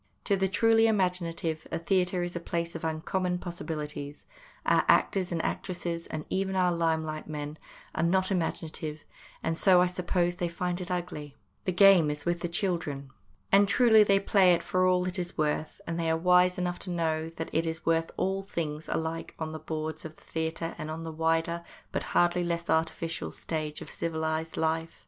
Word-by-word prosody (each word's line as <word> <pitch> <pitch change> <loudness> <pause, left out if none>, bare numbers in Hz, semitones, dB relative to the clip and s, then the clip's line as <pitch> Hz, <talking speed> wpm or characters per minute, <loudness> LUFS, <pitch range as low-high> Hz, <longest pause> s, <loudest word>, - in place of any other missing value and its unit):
To 200 - +2
the 190 0 +1
truly 225 +3 +4
imaginative 175 -6 0
a - - 0
theatre 180 +1 +1
is 175 0 -4
a - - -1
place 170 0 -3
of 165 - -7
uncommon 180 +3 -1
possibilities; 150 -4 -6 0.4
our - - +4
actors 185 -2 +3
and 170 - -1
actresses, 170 -2 -3
and 155 -1 -5
even 190 0 -1
our 180 -1 +3
lime 165 -2 +1
light 155 0 -5
men, 150 0 -5 0.3
are - - -1
not 185 +3 +2
imaginative, 160 -3 -2 0.4
and 165 - 0
so, 185 +1 +5
I 180 - +5
suppose, 180 -1 0
they 175 - 0
find 180 +1 -2
it 180 - -6
ugly. 170 -5 -4 0.3
The 185 - +1
game 185 -4 +6
is 150 -1 -4
with 175 0 0
the 175 - -2
children. 165 -7 -2 0.4
And 200 +1 +6
truly 220 +1 +6
they 200 -1 +4
play 195 -2 +5
it - - -4
for 185 0 +2
what 180 0 +2
it 185 +1 -3
is 175 +1 -5
worth, 155 0 -1
and 165 0 -3
they 165 -1 0
are 160 - +2
wise 180 +1 +4
enough 180 -1 -2
to 190 - -6
know 160 -2 -1
that 165 0 -6
it 165 +1 +1
is 160 0 -4
worth 165 0 +2
all 195 +1 0
things, 160 -5 -4
alike 160 0 -3
on 160 -1 -4
the 155 - -6
boards 155 0 -4
of 155 -1 -8
the - - -21
theatre 160 +1 -3
and 155 - -4
on 160 +1 -5
the 165 - -5
wider, 165 +1 0 0.3
but - - -1 0.2
hardly 175 0 +3
less 170 0 -1
artificial, 165 0 -1
stage 155 -2 -4
of - - -8
civilised 160 0 -2
life. 160 0 -1
170 Hz, 195 wpm, -29 LUFS, 160-180 Hz, 0.4 s, game